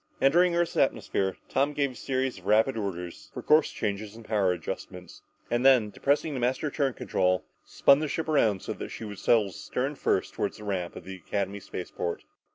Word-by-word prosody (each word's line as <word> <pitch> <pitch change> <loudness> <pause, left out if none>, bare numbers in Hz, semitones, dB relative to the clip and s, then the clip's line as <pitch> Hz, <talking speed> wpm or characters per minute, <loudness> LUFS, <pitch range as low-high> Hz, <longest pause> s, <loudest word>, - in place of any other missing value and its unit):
Entering 170 +5 +4
Earth's 170 0 0
atmosphere, 95 -1 +1
Tom 140 +2 +1
gave 140 -2 0
a - - -13
series 130 -1 -2
of 95 - -13
rapid 110 +5 +4
orders 90 -5 -5
for - - -5
course 155 0 +4
changes 105 0 -4
and 115 -1 -12
power 100 -4 +2
adjustments, 90 0 -6 0.3
and 120 +1 +1
then, 125 -6 +5
depressing 145 +5 0
the 130 - -3
master 130 +4 0
turn 135 -3 0
control, 90 0 0 0.2
spun 140 - +4
the 155 - -1
ship 160 +3 -3
around 110 -11 +2
so - - -3
that - - -7
she 115 - -7
would 105 -2 -7
settle 110 -4 +3
stern 130 +9 -3
first 140 - 0
toward - - -2
her 105 - -11
ramp 95 -4 -3
at - - -9
the 95 +1 -8
Academy 100 +2 -3
spaceport. 90 -2 -5
110 Hz, 195 wpm, -28 LUFS, 95-140 Hz, 0.3 s, then